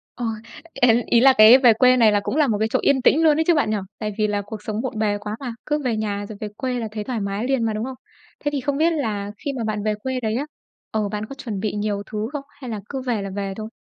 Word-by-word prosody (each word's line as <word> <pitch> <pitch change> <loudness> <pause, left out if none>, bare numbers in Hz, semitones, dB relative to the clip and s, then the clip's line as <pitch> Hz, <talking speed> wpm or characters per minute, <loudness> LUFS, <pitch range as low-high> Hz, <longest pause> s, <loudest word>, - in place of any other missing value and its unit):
Ờ, 245 - -4 0.5
y 245 - +3 0.2
ý 235 - +4
là 265 +1 +7
cái 220 +4 +9
về 245 -4 +6
quê 255 +3 +5
này 225 -3 +5
là 205 - +3
cũng 200 - -3
là 300 -2 +3
một 215 -4 +1
cái 220 - +2
chỗ - - +2
yên 270 -2 +3
tĩnh 310 +6 +4
luôn 305 -2 +5
ấy 320 - +3
chứ 345 - +6
bạn 290 -8 +1
nhỉ? 215 - +1 0.2
Tại 210 -1 -3
vì 215 -1 +2
là 205 -1 -1
cuộc 210 0 -8
sống 215 +1 -3
bộn 250 -3 -4
bề 210 -1 +1
quá 210 +1 -5
mà, 250 -4 -5
cứ 295 0 0
về 240 -3 +1
nhà 205 -1 -2
rồi 215 - -8
về 215 - -3
quê 255 -2 -2
là 225 - -3
thấy 215 -1 -4
thoải 245 0 -3
mái 200 +1 -3
liền 265 -4 +1
mà, 220 - 0
đúng 215 +1 -3
không? 260 0 -6 0.5
Thế 290 - +1
thì 285 -2 -2
không 280 +1 -1
biết 330 +3 +3
là 210 -9 -2
khi 280 - -1
mà 235 - -2
bạn 215 -2 -2
về 215 0 +1
quê 255 +4 -3
đấy 220 -2 -2
á 280 - -1 0.5
ờ, 215 -2 -1
bạn 210 +1 -4
có 275 - -9
chuẩn 225 -8 -5
bị 210 +1 -2
nhiều 205 -1 -2
thứ 215 0 -2
không 290 - -4 0.2
hay 255 - -6
là 220 -2 -4
cứ 270 -2 -4
về 245 -5 -1
là 195 - -5
về 195 -1 -3
thôi? 215 0 -5
220 Hz, 310 wpm, -22 LUFS, 210-260 Hz, 0.5 s, cái